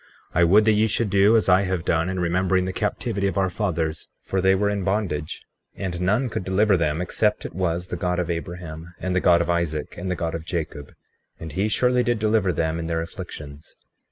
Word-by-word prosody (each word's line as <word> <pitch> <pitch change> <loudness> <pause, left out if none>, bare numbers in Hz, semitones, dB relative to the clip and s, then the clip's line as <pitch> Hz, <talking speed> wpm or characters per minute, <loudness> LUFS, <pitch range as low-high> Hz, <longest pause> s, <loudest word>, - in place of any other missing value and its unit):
36:2 - - +1
I - - +6
would 105 +5 +5
that 110 - +5
ye 110 +1 +3
should 110 +1 0
do 100 +3 +5
as 110 - 0
I 95 0 +5
have 95 -3 -2
done, 80 +2 +1
in 95 0 -2
remembering 90 +1 +1
the 95 - -3
captivity 105 -1 -1
of 100 - -2
our 95 -1 +1
fathers; 85 -6 -2
for 95 - -1
they 95 +1 +4
were 100 +2 +1
in 100 -1 -1
bondage, 95 -7 -2 0.3
and 90 -3 -4
none 105 +8 +2
could 110 - -4
deliver 95 +2 +3
them 80 -2 0
except 105 +4 0
it - - -6
was 90 0 -2
the 90 - -3
God 90 0 -1
of 90 -2 -1
Abraham, 85 0 -6
and 95 -1 -2
the - - +4
God 85 -1 +5
of 85 - -2
Isaac, 80 -3 -2
and 95 +1 -4
the 90 - 0
God 85 -1 -3
of 85 -1 -4
Jacob; 80 -4 -5 0.5
and 80 -1 -7
he 95 +7 0
surely 125 +3 +2
did 120 -1 +1
deliver 105 -3 +2
them 80 0 -1
in 80 - -4
their 80 0 -1
afflictions. 75 -3 -9
90 Hz, 230 wpm, -23 LUFS, 85-100 Hz, 0.5 s, I